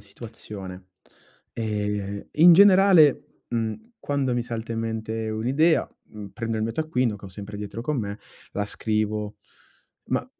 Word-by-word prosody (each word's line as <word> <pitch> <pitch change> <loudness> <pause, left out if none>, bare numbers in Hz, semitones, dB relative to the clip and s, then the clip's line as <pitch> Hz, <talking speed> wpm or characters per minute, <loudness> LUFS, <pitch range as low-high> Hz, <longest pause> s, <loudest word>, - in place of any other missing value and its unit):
situazione. 100 -3 -10 0.7
Ehm, 105 -2 -3
in 170 +2 +8
generale, 190 -6 +5
mhmm, 120 - -3
quando 140 -3 -1
mi 120 - 0
salta 115 -1 -5
in 115 - -3
mente 110 0 -3
un'idea, 130 +10 +2 0.2
mhmm, 105 -2 -10
prendo 115 +2 -4
il 110 - -1
mio 115 +1 -1
taccuino, 130 -7 0
che 100 - -14
ho - - -9
sempre 100 +2 -8
dietro 105 +3 -6
con 150 0 -1
me, 100 -1 -4 0.3
la 105 - -1
scrivo. 105 0 -2 0.7
Ma - - -1
110 Hz, 145 wpm, -25 LUFS, 105-130 Hz, 0.7 s, in